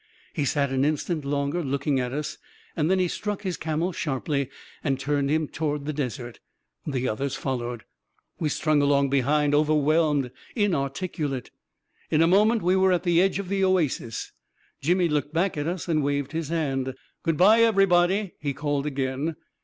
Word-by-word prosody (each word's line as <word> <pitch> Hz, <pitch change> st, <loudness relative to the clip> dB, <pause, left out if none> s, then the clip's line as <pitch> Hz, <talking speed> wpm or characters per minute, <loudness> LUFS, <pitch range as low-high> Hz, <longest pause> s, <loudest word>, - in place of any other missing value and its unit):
" -, -, -29 dB
He 145 Hz, -, -1 dB
sat 140 Hz, -1 st, +1 dB
an 135 Hz, 0 st, +1 dB
instant 155 Hz, +2 st, -1 dB
longer 140 Hz, +4 st, -1 dB
looking 140 Hz, 0 st, 0 dB
at 125 Hz, -1 st, -2 dB
us, 150 Hz, +2 st, -4 dB, 0.4 s
then 170 Hz, +4 st, +2 dB
he 185 Hz, -1 st, +2 dB
struck 205 Hz, +3 st, -4 dB
his 185 Hz, -3 st, -2 dB
camel 160 Hz, +3 st, -1 dB
sharply, 140 Hz, -3 st, -2 dB, 0.3 s
and 135 Hz, -2 st, 0 dB
turned 140 Hz, -1 st, 0 dB
him 155 Hz, +1 st, +1 dB
toward 150 Hz, -2 st, -3 dB
the 155 Hz, -, -2 dB
desert. 125 Hz, -4 st, -4 dB, 0.5 s
The 130 Hz, -3 st, -1 dB
others 135 Hz, +4 st, -2 dB
followed... 120 Hz, -4 st, -3 dB, 0.6 s
We 155 Hz, -, 0 dB
strung 155 Hz, 0 st, +2 dB
along 140 Hz, -1 st, +3 dB
behind, 145 Hz, +2 st, +2 dB
overwhelmed, 150 Hz, -2 st, +2 dB, 0.3 s
inarticu 165 Hz, -4 st, -1 dB
late... 130 Hz, -3 st, -5 dB, 0.6 s
In 155 Hz, +1 st, +4 dB
a -, -, +4 dB
moment 210 Hz, +4 st, +4 dB
we 180 Hz, +2 st, +3 dB
were 190 Hz, 0 st, +4 dB
at 180 Hz, -1 st, +1 dB
the 175 Hz, -1 st, +4 dB
edge 190 Hz, 0 st, +2 dB
of 200 Hz, -2 st, -4 dB
the 195 Hz, +1 st, 0 dB
oasis. 165 Hz, -11 st, 0 dB, 0.5 s
Jimmy 175 Hz, +4 st, +2 dB
looked 150 Hz, 0 st, -1 dB
back 180 Hz, +4 st, +1 dB
at 145 Hz, 0 st, -2 dB
us 180 Hz, +1 st, -3 dB
and 160 Hz, -3 st, +2 dB
waved 140 Hz, -1 st, -1 dB
his 160 Hz, -2 st, -3 dB
hand. 135 Hz, -5 st, -1 dB
" -, -, -45 dB
Good 165 Hz, -2 st, 0 dB
bye, 215 Hz, +6 st, +6 dB
everybody! 195 Hz, -3 st, +3 dB
" -, -, -49 dB
he 140 Hz, -2 st, -2 dB
called 145 Hz, 0 st, -1 dB
again. 135 Hz, +3 st, -2 dB
150 Hz, 180 wpm, -25 LUFS, 140-175 Hz, 0.6 s, bye